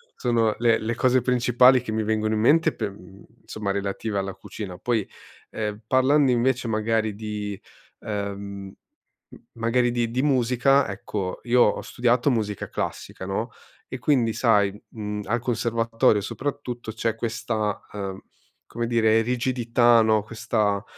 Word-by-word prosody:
sono 115 -3 +1
le 115 -1 +3
le 115 +1 -2
cose 130 0 +3
principali 125 0 +4
che 110 - -5
mi 110 0 0
vengono 110 0 0
in 105 - 0
mente 160 +7 +4
per 100 - -3
uhm, 95 0 -15 0.2
insomma 105 -2 -5
relative 100 +1 -3
alla 95 -1 -2
cucina. 95 -5 -8
Poi, 115 -5 -1 0.4
ehm, 105 0 -4
parlando 130 +2 +3
invece 125 0 +1
magari 110 0 0
di, 105 -2 -5 0.4
ehm, 100 -1 -5 0.6
m - - -14 0.2
magari 120 +1 +1
di 120 -1 0
di 125 +4 -1
musica, 130 0 +3
ecco 100 -1 -4
io 120 0 +3
ho 105 - +3
studiato 125 +2 +1
musica 105 -4 -2
classica, 95 - -5
no. 110 +5 -3 0.4
E 130 - -6
quindi 120 -6 +2
sai, 105 -5 +3 0.2
uhm, 105 -1 -4
al 120 +4 0
conservatorio 115 -3 +1
soprattutto, 125 -1 -5
c'è 115 0 -1
questa, 110 -2 -3
ehm, 95 -2 -5 0.5
come 120 0 -4
dire 115 -1 +3
rigidità, 120 -1 +3
no, 110 -1 +2
questa 110 -2 -1
115 Hz, 145 wpm, -24 LUFS, 105-120 Hz, 0.6 s, principali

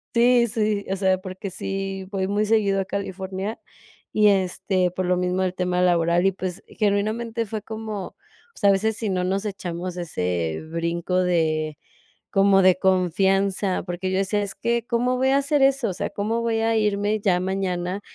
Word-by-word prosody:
Sí, 240 0 +5
sí, 210 -2 0
o - - +1
sea, 190 -1 +2
porque 185 +1 -7
sí 195 +1 -4
voy 195 -2 -1
muy 205 +2 +1
seguido 205 -3 +2
a - - -4
California, 190 +1 -4 0.5
y 210 -1 +5
este, 190 -1 +1
por 185 +1 -3
lo 180 0 +2
mismo 180 +1 0
del 185 -1 -1
tema 180 -1 0
laboral. 170 0 +3
Y, 195 - +4
pues, 185 -1 -5
genuinamente 220 +3 -1
fue 215 0 -5
como 215 -3 -6 0.4
o - - -22
sea, 200 - +4
a - - +5
veces 215 +2 0
sí 220 - -2
no 185 -1 0
nos 195 +3 -1
echamos 180 -3 -4
ese 90 - -2
brinco 170 +2 -1
de 155 -3 0 0.5
como 195 0 +4
de 185 -1 +6
confianza, 190 +1 +1
porque 180 +1 -3
yo 190 - 0
decía: 205 +2 0
"Es 200 -1 -4
que, 235 +1 -1
¿cómo 245 +1 0
voy 260 +1 +2
a 270 - +4
hacer 280 +1 +1
eso? 270 -4 +3
O - - -3
sea, - - -3
¿cómo 220 +3 -1
voy 230 -1 0
a 225 0 +2
irme 210 0 +1
ya 190 -3 +2
mañana 185 0 -2
195 Hz, 185 wpm, -23 LUFS, 180-215 Hz, 0.5 s, de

